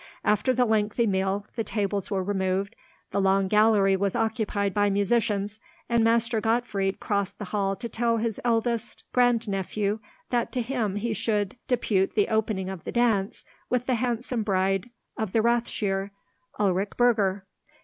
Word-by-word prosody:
After 210 +5 +2
the 250 0 +2
lengthy 220 +1 +1
meal, 195 0 0
the 230 - -1
tables 200 -3 -2
were 195 -2 -1
removed, 195 +1 -1 0.4
the 200 - +1
long 195 0 +3
gallery 210 -1 +4
was 200 +2 -1
occupied 220 -3 0
by 205 +1 +2
musicians, 205 0 0 0.3
and 235 -1 +2
Master 230 0 +2
Gottfried 215 -4 0
crossed 200 -1 -1
the 205 - -5
hall 195 0 -1
to 235 - -5
tell 230 +1 0
his 225 -1 -2
eldest 235 0 -1
grandnephew 215 -4 +1 0.3
that 240 -2 0
to 250 -2 0
him 230 -5 -1
he 220 +2 -1
should 210 -3 -1
depute 210 -6 +1
the 205 -2 +2
opening 215 -4 0
of 190 -3 -6
the - - -5
dance 225 -5 +1 0.3
with 250 -1 0
the 255 - +1
handsome 245 0 -1
bride 195 +1 0 0.3
of 220 -4 -2
the 225 - +4
Rathsherr, 210 -4 0 0.5
Ulrich 200 0 +1
Burger. 205 -6 +2
210 Hz, 155 wpm, -26 LUFS, 195-230 Hz, 0.5 s, gallery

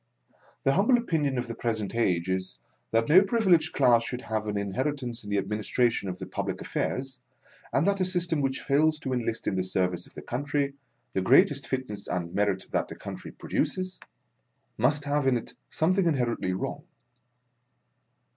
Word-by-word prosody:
The 135 - +3
humble 215 - +4
opinion 155 - 0
of 125 - -1
the 115 - -4
present 110 -3 -2
age, 90 -7 +1
is, 95 0 -2 0.3
that 115 0 +2
no 175 +5 +8
privileged 195 -7 +3
class 120 -4 +4
should 125 +1 -4
have 110 -1 -2
an 105 -1 -1
in 100 -1 -2
heritance 130 -1 -2
in 105 - -8
the 100 - +1
administration 105 +2 0
of 90 - -4
the 95 - -6
public - - -3
affairs, 130 0 -3 0.5
and 140 - +2
that 200 0 +2
a - - +3
system 175 -4 0
which 135 -1 -1
fails 155 +3 +3
to 130 -3 -2
enlist 115 -2 -2
in - - 0
the 95 - +1
service 90 -1 -1
of - - -17
the - - -8
country, 140 +2 -1 0.4
the 95 - +1
greatest 135 +5 +4
fitness 125 -7 -4
and 85 -1 -3
merit 100 -2 0
that - - 0
the - - -8
country - - -8
produces, 185 0 -2 0.8
must 145 +6 +2
have 145 -1 0
in 130 -2 +4
it 115 - -8 0.2
something 185 +4 +2
inhe 160 -4 +2
rently 95 -6 -2
wrong. - - -4
125 Hz, 180 wpm, -28 LUFS, 105-150 Hz, 0.8 s, no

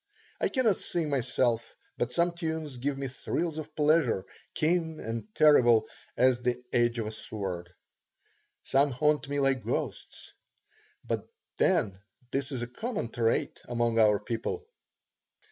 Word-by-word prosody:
I - - +1
cannot 235 -8 +2
sing 165 -4 -1
myself, 120 -3 0 0.2
but 120 0 -1
some 170 +5 +2
tunes 160 -5 -4
give 135 +3 -2
me 135 0 -3
thrills 160 +5 -2
of 155 - -8
pleasure, 150 - +3 0.3
keen 160 0 +1
and 115 -1 -4
terrible 120 -7 +6 0.3
as 130 -1 +4
the 125 0 0
edge 120 0 +3
of 115 - -1
a 110 - -3
sword. 95 -5 -5 0.9
Some 140 +2 +3
haunt 140 +1 +1
me 145 0 0
like 135 -3 +2
ghosts. - - -4 0.7
But - - -2 0.3
then 95 -2 +2 0.3
this 135 +1 -2
is 125 -3 -3
a - - -4
common 195 - -4
trait 115 -1 0
among 120 -1 +1
our 105 -2 +5
people. 115 - -3
130 Hz, 140 wpm, -29 LUFS, 115-155 Hz, 0.9 s, terrible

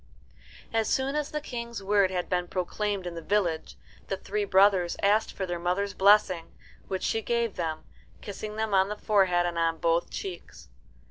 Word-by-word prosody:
As 225 -1 +1
soon 270 +2 0
as 300 -1 -1
the 300 - -3
King's 235 -6 -6
word 200 -1 +3
had 180 -1 -2
been 180 -1 -1
proclaimed 195 +2 -2
in 175 - -4
the 165 - -6
village, 175 -3 -1 0.3
the 195 - -2
three 205 +2 -2
brothers 190 -2 +4
asked 210 +2 +3
for 190 - -4
their 175 -1 -3
mother's 185 +3 -1
blessing, 195 -3 +3 0.3
which 190 -1 -3
she 225 - 0
gave 235 -1 -1
them, 160 -3 -3 0.4
kissing 210 +1 -7
them 220 -1 -2
on 190 0 +4
the 210 - -4
forehead 190 -5 +2
and 170 -1 -2
on 165 -1 +1
both 170 +1 +1
cheeks. 180 - -8
195 Hz, 180 wpm, -28 LUFS, 175-210 Hz, 0.4 s, brothers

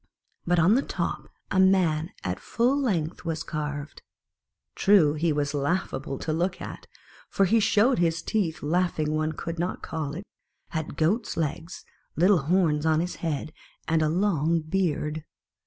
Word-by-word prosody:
But 175 0 +3
on 170 +5 +5
the 260 - +3
top - - -4 0.2
a 190 - +2
man 180 -4 +3
at 90 +1 -3
full 245 +4 +1
length 185 - -1
was 165 -2 -3
carved. 145 -2 -5 0.7
True 190 -8 +4
he 160 +2 0
was 145 -1 -1
laughable 145 -1 -2
to 155 - -3
look 175 +3 -1
at; - - -8 0.4
for 195 - +2
he 225 +5 +3
showed 225 +3 +3
his 165 -1 +1
teeth 180 -7 -1
laughing 155 -1 0
one 155 0 0
could 165 +1 -5
not 175 +2 -2
call 155 -3 -4
it 185 - -6 0.5
had 160 -3 -4
goat's 200 +9 0
legs, 165 +2 -3 0.3
little 180 +2 +4
horns 155 -1 +2
on 160 -1 +3
his 175 +2 -3
head, 155 -1 -3 0.3
and 160 0 +2
a 155 - +2
long 165 -2 +1
beard. 155 -2 -1
165 Hz, 155 wpm, -26 LUFS, 155-185 Hz, 0.7 s, on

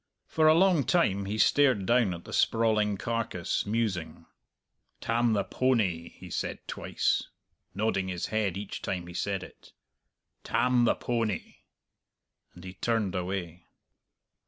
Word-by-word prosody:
For 155 -1 +2
a 155 - +7
long 180 -4 +4
time 100 - +2
he 105 +2 -3
stared 130 -5 +4
down 115 -4 +3
at 85 - -10
the - - -9
sprawling 110 -3 +2
carcass, 115 -6 -2
musing. 105 -6 -2 0.7
"Tam 115 0 +1
the 100 -2 +1
powney," 100 -12 0
he - - -12
said - - -2
twice, - - -1 0.5
nodding 100 -2 0
his 90 -2 -3
head 105 -4 0
each 100 0 -6
time 90 -2 -3
he 85 - -10
said 95 +1 -2
it; - - -15 0.7
"Tam 125 -1 +2
the - - +3
powney," 115 -4 -2 1.0
and 90 - -12
he 95 0 -8
turned 110 -3 -1
away. 90 -2 -4
105 Hz, 135 wpm, -28 LUFS, 95-115 Hz, 1.0 s, a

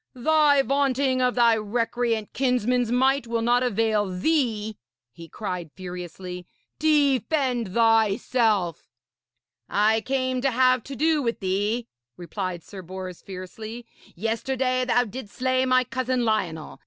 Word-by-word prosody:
'Thy 290 +1 +4
vaunting 270 -1 +1
of 250 -1 +1
thy 235 -2 +5
recreant 230 0 -1
kinsman's 250 -2 +1
might 265 +1 +2
will 230 0 -1
not 240 +1 +3
avail 220 -3 +1
thee,' 220 - 0 0.4
he 165 +5 -12
cried 180 -5 -5
furiously. 180 0 -7 0.3
'Defend 275 - +1
thyself!' 220 - +2 0.8
'I 220 +2 +3
came 255 0 -1
to 275 - +2
have 255 0 +3
to 275 - -7
do 310 +3 +2
with 235 -3 -2
thee,' 205 +5 -1 0.3
replied 175 0 -5
Sir 195 - -10
Bors 185 0 -8
fiercely. 215 +5 -8 0.3
'Yesterday 255 +5 -1
thou 245 0 +3
didst 230 -1 -9
slay 255 0 +1
my 255 0 +4
cousin 255 -1 -1
Lionel. 180 -8 -2
235 Hz, 125 wpm, -25 LUFS, 205-255 Hz, 0.8 s, thy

